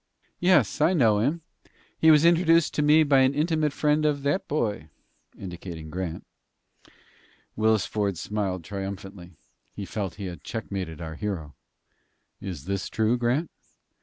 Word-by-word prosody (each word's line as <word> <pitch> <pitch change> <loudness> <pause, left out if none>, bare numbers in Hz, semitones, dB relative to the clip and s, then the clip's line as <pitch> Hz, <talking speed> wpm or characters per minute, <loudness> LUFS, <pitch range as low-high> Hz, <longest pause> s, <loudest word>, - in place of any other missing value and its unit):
"Yes; 165 - +3
I 165 +4 +4
know 115 - +3
him. 145 +10 0 0.6
He 160 - +5
was 155 0 +6
introduced 165 -1 +4
to - - 0
me 150 +2 +5
by 140 -2 +4
an 130 +1 +3
intimate 155 -1 +1
friend 150 +1 +1
of 145 -2 0
that 185 +8 0
boy," 105 - -2 0.5
indicating 85 -4 -8
Grant. 90 -2 -5 1.3
Willis 110 -3 +2
Ford 100 -4 -2
smiled 95 -2 -3
triumphantly. 95 -1 -7 0.4
He 100 - -5
felt 95 -3 -4
that - - -21
he 100 - -5
had 90 -2 -7
checkmated 95 -7 -5
our 80 -1 -6
hero. 80 -6 -5 0.9
"Is 90 -8 -7
this 100 0 -3
true, 110 +2 +1
Grant?" 125 +7 0
110 Hz, 145 wpm, -26 LUFS, 95-150 Hz, 1.3 s, was